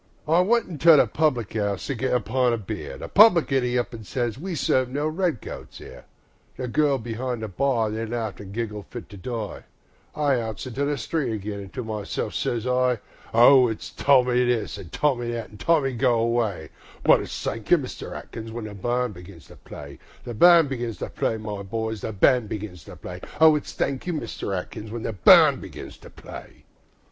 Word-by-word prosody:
Tommy 160 +1 +2
I 175 - +6
went 230 +5 +2
into 160 -2 +5
a - - +5
public 125 -3 -1
'ouse 100 -3 -1
to 140 - -2
get 130 +1 -2
a 125 - +3
pint 125 +2 +1
o' - - -4
beer, 90 -9 -6
The - - -7
publican 170 - +5
'e 125 0 0
up 120 0 -2
an' 110 -1 -8
sez, 120 +1 -2
"We 175 +6 -5
serve 130 -3 +1
no 145 +4 -1
red 160 - -1
coats - - -9
here." 65 - -12 0.5
The 125 - -4
girls 140 0 +1
be'ind 120 0 -4
the - - -2
bar 115 +1 0
they 110 +1 -3
laughed 110 -4 -4
an' 100 -1 -10
giggled 105 -2 -5
fit 120 - -9
to 100 - -11
die, 110 +1 -6 0.5
I 140 -5 +1
outs 110 +1 -5
into 130 +3 -2
the 145 0 -1
street 135 +1 -2
again 105 -1 -5
an' 100 - -9
to 125 - -6
myself 110 -2 -4
sez 115 -1 -2
I: 125 -1 +2 0.3
O 125 +2 +7
it's 110 -2 -5
Tommy 125 -3 +3
this, 120 -4 -1
an' 90 -4 -10
Tommy 120 - 0
that, 115 -2 -5
an' 105 - -13
"Tommy, 145 -1 +1
go 120 0 +2
away"; 115 -9 -1 0.3
But - - +5
it's - - -6
"Thank 110 0 -4
you, 175 - +7
Mister 135 -5 -7
Atkins", 115 0 -8
when 115 0 -6
the 105 - -7
band 120 +3 -1
begins 90 -3 -13
to - - -13
play, 70 -1 -11 0.2
The 120 - -6
band 170 +4 +6
begins 120 -5 -4
to - - -6
play, 110 - -1
my 105 -2 -6
boys, 110 +1 -4
the - - -4
band 110 +2 +3
begins 95 -6 -6
to - - -11
play, - - -9 0.2
O 160 -1 +7
it's 150 - -4
"Thank 135 +4 -2
you, 175 - -1
Mister 115 -8 -4
Atkins", 105 +4 -6
when 115 +1 -6
the 115 - -3
band 95 - +6
begins - - -10
to - - -13
play. - - -12
120 Hz, 210 wpm, -24 LUFS, 110-135 Hz, 0.5 s, O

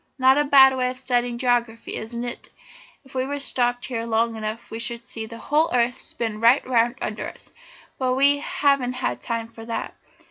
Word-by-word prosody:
Not 265 +1 +5
a - - +4
bad 270 -2 +7
way 250 -1 0
of 255 - -6
studying 245 -2 0
geography, 240 -2 -1
is 225 +2 -6
it? 240 0 -5 0.6
If 265 - -18
we 265 +2 -2
stopped 245 -3 0
here 235 -3 -3
long 230 0 0
enough 220 +1 -5
we 225 - -5
should 235 -1 -3
see 225 -3 -5
the 230 - -9
whole 305 +6 +1
earth 240 0 +1
spin 220 -2 -5
right 240 +4 +5
round 240 -1 +2
under 215 - -4
us, - - -15 0.5
but 255 -1 +1
we 280 +2 +4
haven't 275 -4 +1 0.3
time 230 -1 -3
for 225 0 -12
that. 230 0 -4
245 Hz, 185 wpm, -23 LUFS, 230-260 Hz, 0.6 s, bad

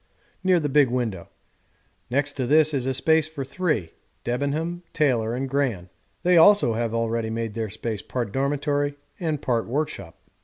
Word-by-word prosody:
near 185 -2 +4
the 150 - -1
big 145 -2 +4
window; 115 -8 -3 0.8
next 140 +3 0
to 130 -3 -2
this 155 +2 +4
is 130 -2 -1
a 135 - +1
space 160 +3 +3
for 155 -3 -6
three 140 - -1 0.3
Debenham, 145 +8 -2
Taylor, 120 -6 +1
and 135 +2 -2
Gran; 125 -10 -1 0.3
they 180 0 +4
also 185 - +6
have 115 0 -2
already 115 0 -1
made 115 -1 -3
their 110 -1 -3
space 110 0 -4
part 120 -5 -4
dormitory 145 +2 0 0.2
and 155 -4 -2
part 120 -3 0
workshop. 145 - -3
135 Hz, 160 wpm, -24 LUFS, 115-150 Hz, 0.8 s, also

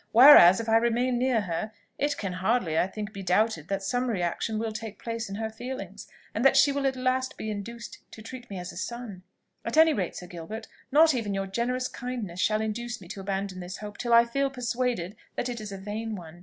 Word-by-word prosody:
Whereas 225 -7 +10
if 230 - -4
I 225 0 +5
remain 240 +2 +1
near 250 -3 +2
her, 195 +3 -3 0.3
it 290 0 0
can 195 -3 -3
hardly, 185 -2 0
I 175 - +3
think, 210 +2 -6
be 200 - -6
doubted 185 -3 +1
that 195 0 -2
some 245 +5 0
reaction 195 +2 -1
will 225 0 -2
take 215 -1 -7
place 230 -2 -4
in 195 - -5
her 220 +1 -3
feelings, 255 +4 -7 0.3
and 225 - -1
that 270 0 +6
she 280 +1 +6
will 275 0 0
at 265 - 0
last 255 0 -1
be 215 - -4
induced 230 +3 -7
to 220 - -12
treat 245 +2 -9
me 195 - -6
as 180 +1 -6
a - - -10
son. 235 -6 -6 0.4
At - - -3
any 320 0 +7
rate, 185 - -2
Sir 180 - -7
Gilbert, 180 +6 -7 0.2
not 310 +2 +6
even 215 -5 -2
your 195 0 -1
generous 245 +6 -1
kindness 240 -10 -5
shall 215 +2 +2
induce 235 +2 -3
me 180 - -13
to 195 - -7
abandon 195 -1 -3
this 180 +1 -6
hope 210 -1 -9
till 240 - -2
I 235 0 +7
feel 275 +4 0
persuaded 245 -6 -2 0.2
that 245 - -2
it 235 -2 -5
is 210 -1 -7
a 195 - -5
vain 215 +3 -4
one. 170 -2 -10
220 Hz, 230 wpm, -27 LUFS, 195-245 Hz, 0.4 s, Whereas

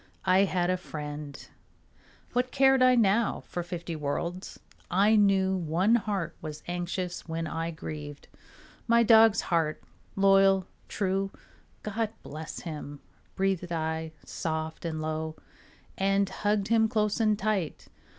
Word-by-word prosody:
I 190 +2 +5
had 180 -1 0
a 185 - +1
friend; 150 -4 -7 0.9
what 250 +1 +1
cared 270 0 +4
I 255 0 +6
now 225 -1 +2
For 175 - -5
fifty 175 -1 -5
worlds? 170 +5 -4 0.3
I 200 +4 +4
knew 195 -2 +3
One 180 +5 +1
heart 200 -7 0
was 155 -1 -7
anxious 175 +1 -4
when 165 0 -3
I 165 +1 -3
grieved 150 -3 -7 0.6
My 235 0 +5
dog's 225 -2 +6
heart, 165 -3 0 0.3
loyal, 195 -1 +5 0.2
true. 195 0 -1 0.5
"God 220 +1 -1
bless 155 +2 -7
him," 150 -3 -7 0.4
breathed 190 -2 -1
I 160 -1 -2
soft 160 0 -4
and 155 -1 -3
low, 155 0 -3 0.6
And 195 +1 +2
hugged 205 +1 -1
him 225 -1 +4
close 215 -2 0
and 215 -2 +3
tight. 195 -6 -2
185 Hz, 130 wpm, -28 LUFS, 160-205 Hz, 0.9 s, I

